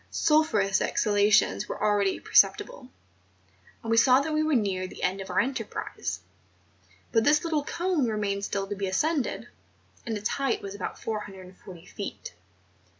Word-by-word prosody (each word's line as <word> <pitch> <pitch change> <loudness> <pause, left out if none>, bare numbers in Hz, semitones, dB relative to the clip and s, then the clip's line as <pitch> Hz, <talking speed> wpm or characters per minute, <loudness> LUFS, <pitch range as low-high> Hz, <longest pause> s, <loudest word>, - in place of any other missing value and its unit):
Sulphureous 220 -11 +2
ex¬ - - 0
halations 205 - +3
were - - -5
already 205 -2 +1
perceptible; - - +2 0.9
and 225 - -3
we 225 - +3
saw 255 +2 +6
that 310 +3 -2
we 305 - +2
were 310 -2 +1
near 195 -5 0
the - - -10
end 190 +2 0
of 190 - -8
our 180 - +1
enterprise; 225 - -3 0.9
but 225 - +3
this 300 +3 +3
little 315 -3 0
cone 340 -4 -1
remained 205 -2 -2
still 200 -1 -2
to 205 +1 -5
be 195 0 -3
ascended, 295 - -1 0.6
and 225 -2 -3
its 210 +1 -2
height 275 -3 -1
was 195 -1 -7
about 200 -2 -5
440 190 -4 -8
feet. - - -7
210 Hz, 155 wpm, -27 LUFS, 195-275 Hz, 0.9 s, saw